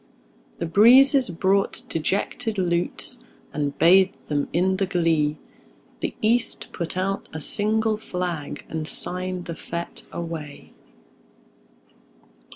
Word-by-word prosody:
The 170 Hz, -, -2 dB
breezes 250 Hz, -, +6 dB
brought 190 Hz, +3 st, +1 dB
dejected 205 Hz, +6 st, -2 dB
lutes, 180 Hz, +7 st, -1 dB, 0.3 s
And 145 Hz, -1 st, -2 dB
bathed 185 Hz, +3 st, +4 dB
them 145 Hz, -1 st, 0 dB
in 190 Hz, +2 st, +2 dB
the 195 Hz, 0 st, 0 dB
glee; 165 Hz, -4 st, +1 dB, 0.6 s
The -, -, -3 dB
East 230 Hz, +2 st, +1 dB
put 170 Hz, +1 st, -4 dB
out 195 Hz, +1 st, -2 dB
a 160 Hz, -, -4 dB
single 215 Hz, +6 st, +1 dB
flag, 175 Hz, -8 st, -4 dB
And 160 Hz, -1 st, -4 dB
signed 180 Hz, +1 st, -2 dB
the 170 Hz, -, -4 dB
fete 170 Hz, +1 st, -6 dB
away. 165 Hz, -4 st, -7 dB
180 Hz, 110 wpm, -24 LUFS, 165-200 Hz, 0.6 s, breezes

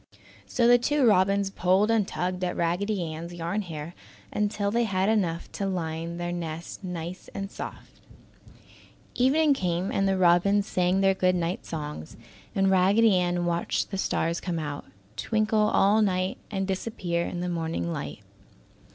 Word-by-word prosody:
So 235 Hz, -2 st, +2 dB
the 245 Hz, 0 st, +7 dB
two 290 Hz, +2 st, +2 dB
robins 195 Hz, -1 st, +3 dB
pulled 190 Hz, +4 st, +2 dB
and 220 Hz, -4 st, +2 dB
tugged 180 Hz, +1 st, -3 dB
at 180 Hz, -, -1 dB
Raggedy 180 Hz, +3 st, 0 dB
Ann's 170 Hz, +2 st, -7 dB
yarn 175 Hz, +5 st, -2 dB
hair 165 Hz, -3 st, -7 dB, 0.4 s
until 205 Hz, -1 st, 0 dB
they 235 Hz, +2 st, +2 dB
had 190 Hz, -1 st, +1 dB
enough 180 Hz, -7 st, 0 dB
to 200 Hz, -, -3 dB
line 165 Hz, -2 st, -3 dB
their 175 Hz, 0 st, -3 dB
nest 170 Hz, +2 st, -6 dB
nice 180 Hz, 0 st, -6 dB
and 195 Hz, 0 st, -4 dB
soft. -, -, -9 dB, 1.1 s
Evening 285 Hz, +4 st, +3 dB
came 180 Hz, -4 st, -1 dB
and 195 Hz, -, +1 dB
the 195 Hz, 0 st, +1 dB
robins 185 Hz, +3 st, +4 dB
sang 185 Hz, -1 st, +1 dB
their 195 Hz, 0 st, +4 dB
good 185 Hz, -1 st, +2 dB
night 175 Hz, +1 st, -2 dB
songs, 150 Hz, -, -6 dB, 0.4 s
and 195 Hz, 0 st, +3 dB
Raggedy 195 Hz, +3 st, +4 dB
Ann 175 Hz, -1 st, +1 dB
watched 170 Hz, +2 st, -1 dB
the 195 Hz, -, -2 dB
stars 170 Hz, -2 st, 0 dB
come 175 Hz, -3 st, -2 dB
out, 150 Hz, -2 st, -4 dB, 0.3 s
twinkle 215 Hz, -, +1 dB
all 205 Hz, +2 st, +4 dB
night 185 Hz, -2 st, 0 dB
and 195 Hz, -2 st, -2 dB
disappear 190 Hz, -3 st, -2 dB
in 175 Hz, -, -4 dB
the 180 Hz, -, -2 dB
morning 160 Hz, -, -2 dB
light. -, -, -6 dB
185 Hz, 160 wpm, -27 LUFS, 170-200 Hz, 1.1 s, the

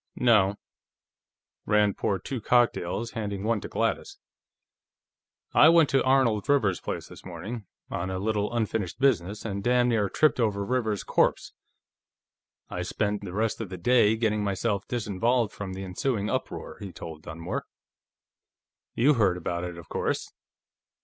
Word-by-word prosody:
"No." 105 Hz, -5 st, +4 dB, 1.1 s
Rand 105 Hz, -1 st, +3 dB
poured 95 Hz, -3 st, -2 dB
two 130 Hz, -4 st, -4 dB
cocktails, 115 Hz, -2 st, +1 dB
handing 100 Hz, -3 st, -4 dB
one 110 Hz, -1 st, 0 dB
to -, -, -6 dB
Gladys. -, -, -2 dB, 1.4 s
"I 155 Hz, -, +8 dB
went 165 Hz, -3 st, +5 dB
to 135 Hz, -, +3 dB
Arnold 130 Hz, -5 st, +2 dB
Rivers's 105 Hz, -11 st, +2 dB
place -, -, -4 dB
this -, -, -13 dB
morning, 110 Hz, -1 st, -7 dB, 0.2 s
on 90 Hz, +2 st, -2 dB
a 95 Hz, -, -2 dB
little 105 Hz, +2 st, -1 dB
unfinished 110 Hz, -4 st, -2 dB
business, 105 Hz, -7 st, +1 dB
and 100 Hz, -2 st, -3 dB
damn 125 Hz, +1 st, +3 dB
near 105 Hz, -4 st, +1 dB
tripped 155 Hz, +6 st, +2 dB
over 100 Hz, -4 st, +1 dB
Rivers's 110 Hz, -4 st, -1 dB
corpse. -, -, +1 dB, 1.1 s
I 90 Hz, -, -4 dB
spent 105 Hz, +3 st, -1 dB
the 100 Hz, -3 st, -7 dB
rest 110 Hz, +4 st, -1 dB
of 110 Hz, -, -5 dB
the 95 Hz, -, -6 dB
day 110 Hz, +3 st, +4 dB
getting 110 Hz, -2 st, 0 dB
myself 100 Hz, +1 st, -1 dB
disinvolved 115 Hz, +1 st, 0 dB
from 95 Hz, -2 st, -6 dB
the 95 Hz, +1 st, -6 dB
ensuing 100 Hz, +3 st, -2 dB
uproar," -, -, -4 dB
he 100 Hz, -2 st, -7 dB
told 80 Hz, -3 st, -9 dB
Dunmore. 80 Hz, +2 st, -5 dB, 1.3 s
"You 140 Hz, +6 st, +4 dB
heard 100 Hz, -8 st, +2 dB
about 85 Hz, 0 st, -3 dB
it, 90 Hz, -1 st, -6 dB
of 85 Hz, -, -11 dB
course." -, -, -2 dB
105 Hz, 150 wpm, -27 LUFS, 95-120 Hz, 1.4 s, I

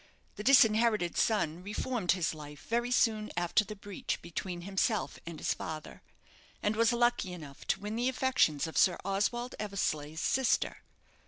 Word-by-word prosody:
The 210 Hz, -, -6 dB
disinherited 220 Hz, -7 st, +4 dB
son 175 Hz, -7 st, +1 dB
reformed 210 Hz, 0 st, 0 dB
his 180 Hz, -4 st, -1 dB
life 150 Hz, -1 st, -10 dB
very 240 Hz, +1 st, 0 dB
soon 220 Hz, -3 st, +2 dB
after 175 Hz, +4 st, +2 dB
the 210 Hz, +1 st, -8 dB
breach 200 Hz, -1 st, -4 dB
between 175 Hz, +1 st, -5 dB
himself 200 Hz, +3 st, -1 dB
and 170 Hz, -2 st, -6 dB
his -, -, 0 dB
father, 155 Hz, -1 st, -7 dB, 0.6 s
and 210 Hz, +1 st, +1 dB
was 230 Hz, +2 st, +4 dB
lucky 240 Hz, -6 st, +1 dB
enough 150 Hz, -6 st, -10 dB
to -, -, +1 dB
win 210 Hz, +2 st, -4 dB
the 245 Hz, +2 st, +1 dB
affections 250 Hz, -, +2 dB
of 160 Hz, -, -1 dB
Sir 180 Hz, -, +4 dB
Oswald 240 Hz, +5 st, -1 dB
Eversleigh's 160 Hz, -7 st, -2 dB
sister. 265 Hz, +6 st, +1 dB
205 Hz, 155 wpm, -31 LUFS, 170-230 Hz, 0.6 s, disinherited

